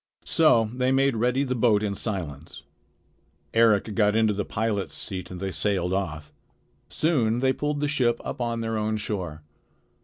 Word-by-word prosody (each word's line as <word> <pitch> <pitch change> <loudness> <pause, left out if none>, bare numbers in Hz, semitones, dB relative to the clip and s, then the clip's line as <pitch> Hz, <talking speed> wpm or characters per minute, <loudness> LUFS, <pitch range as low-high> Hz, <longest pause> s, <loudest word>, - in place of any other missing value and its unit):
So 115 -9 +3
they 125 +1 +1
made 135 -1 +3
ready 125 +4 +1
the 130 -2 -1
boat 110 -4 +3
in 100 -2 -1
silence. 85 -8 -5 0.9
Eric 110 -2 +3
got 105 0 +2
into 110 -1 +3
the 100 +1 -2
pilot's 105 -2 -2
seat 90 -3 -5
and 90 - -7
they 95 0 -3
sailed 95 -2 0
off. 80 -6 -3 0.6
Soon 120 -8 +1
they 130 +1 +2
pulled 145 0 -2
the 145 - +1
ship 125 -5 +1
up - - -5
on 115 -1 -1
their 115 -1 -2
own 110 0 -1
shore. 90 -8 -4
110 Hz, 165 wpm, -25 LUFS, 100-125 Hz, 0.9 s, So